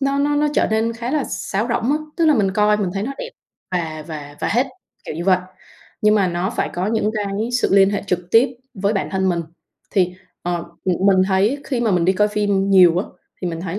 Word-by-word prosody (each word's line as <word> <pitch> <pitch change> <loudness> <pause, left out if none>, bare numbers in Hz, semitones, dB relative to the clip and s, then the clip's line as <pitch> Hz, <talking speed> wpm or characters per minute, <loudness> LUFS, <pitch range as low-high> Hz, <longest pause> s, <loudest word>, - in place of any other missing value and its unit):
nó 275 0 +1
nó 290 +1 +1
nó 300 0 +2
trở - - +3
nên 225 +1 +1
khá 235 +2 -5
là 295 -2 0
sáo 200 +3 -2
rỗng 235 +3 +1
á. 300 - +1 0.2
Tức 335 - +2
là 305 - +5
mình 200 -5 +2
coi 210 +1 +3
mình 200 -4 -1
thấy 195 - -2
nó 270 +6 -3
đẹp - - -5 0.4
và 160 -3 -3
và 145 -2 -8
và - - 0
hết, 245 +6 +2 0.4
kiểu - - -6
như 170 +2 -4
vậy 185 -2 +4 0.6
nhưng 210 0 +5
mà 195 -3 +2
nó 175 +3 -1
phải 230 - -1
có 180 +2 -1
những 215 -1 +1
cái 210 +2 -2
sự 245 - +2
liên 195 0 +6
hệ 205 - -2
trực 180 -1 -2
tiếp 230 +3 +6 0.3
với 200 +1 0
bản 195 - -1
thân 190 -1 0
mình, 175 -2 0 0.5
thì, 180 -2 +1 0.3
ờ, 175 -1 -1 0.2
m 185 +1 +1
mình 190 -1 +5
thấy 205 +8 +2
khi 255 -4 -2
mà 230 - +1
mình 175 -2 +2
đi 190 - +4
coi 210 +2 +2
phim 205 -2 0
nhiều 180 -3 +6
á, 195 - -2 0.4
thì 180 - -1
mình 165 0 -5
thấy 185 +2 -4
200 Hz, 250 wpm, -20 LUFS, 180-225 Hz, 0.6 s, liên